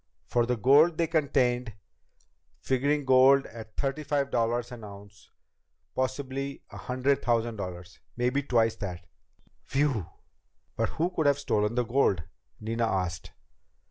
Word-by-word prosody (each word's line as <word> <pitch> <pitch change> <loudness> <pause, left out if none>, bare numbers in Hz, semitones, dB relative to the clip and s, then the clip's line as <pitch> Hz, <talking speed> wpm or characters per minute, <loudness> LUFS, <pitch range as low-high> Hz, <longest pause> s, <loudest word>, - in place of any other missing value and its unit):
For 120 -1 +1
the 125 0 0
gold 145 +8 +5
they 170 - +2
contained, 130 -7 +1 0.9
figuring 140 +2 0
gold 130 +1 +6
at 110 -2 -11
thirty 140 +2 -1
five 140 -1 -1
dollars 120 +1 0
an 120 -2 -9
ounce, 100 0 -13 0.6
possibly 135 +1 -3
a - - -9
hundred 130 +2 0
thousand 115 -1 0
dollars. 90 -2 -7 0.2
Maybe 125 +3 +1
twice 115 -5 +2
that." 90 -3 -6 0.6
"Whew!" 135 - 0 0.7
"But - - 0
who 170 +3 +1
could 160 -4 0
have 140 -1 +4
stolen 110 -5 0
the 125 -1 +1
gold?" 115 -8 +2 0.4
Nina 115 +1 -1
asked. 90 -4 -3
125 Hz, 135 wpm, -28 LUFS, 110-140 Hz, 0.9 s, gold